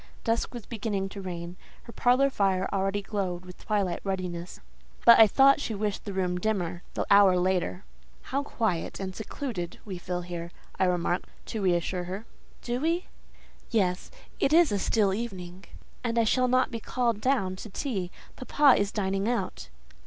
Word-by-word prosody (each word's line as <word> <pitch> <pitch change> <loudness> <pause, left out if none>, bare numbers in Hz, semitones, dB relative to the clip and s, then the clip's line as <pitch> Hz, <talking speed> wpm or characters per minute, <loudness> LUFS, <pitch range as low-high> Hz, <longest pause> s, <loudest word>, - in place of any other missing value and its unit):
Dusk 230 0 0
was 240 -4 -8
beginning 205 -4 -3
to 200 - -8
reign; 175 -1 -6 0.3
her 235 - -11
parlour 260 +3 +3
fire 190 -4 +1
already 195 +1 0
glowed 185 -4 -3
with 180 0 -12
twilight 200 -5 0
ruddiness; 180 -3 -4 0.5
but 235 - +9
I 220 - +10
thought 275 +6 +5
she 225 - -3
wished 205 0 -2
the 205 - -4
room 180 -1 -1
dimmer, 180 -4 -1
the - - -1
hour 200 -2 +7
later. 180 +1 0 0.4
"How 275 +2 -1
quiet 220 -11 -2
and 190 -1 -5
secluded 220 - -5
we 190 -4 -6
feel 180 0 -3
here!" 175 -1 -6 0.3
I 190 - +4
remarked, 180 0 0 0.2
to 220 - -3
reassure 180 -1 0
her. 190 +5 -6 0.4
"Do 240 0 -2
we? 335 +3 0 0.6
Yes; 185 -5 0 0.3
it 275 - +2
is 335 -4 +6
a 205 - +1
still 200 -1 +2
evening, 190 -5 -6 0.4
and 235 -1 -1
I 230 - +5
shall 255 +3 +2
not 255 +1 +2
be 230 - -4
called 235 -2 -1
down 225 -8 +1
to 220 - -8
tea; 195 -5 -3 0.3
papa 270 -1 +4
is 200 0 -1
dining 195 +1 -1
out." 245 - -3
200 Hz, 170 wpm, -28 LUFS, 180-230 Hz, 0.6 s, I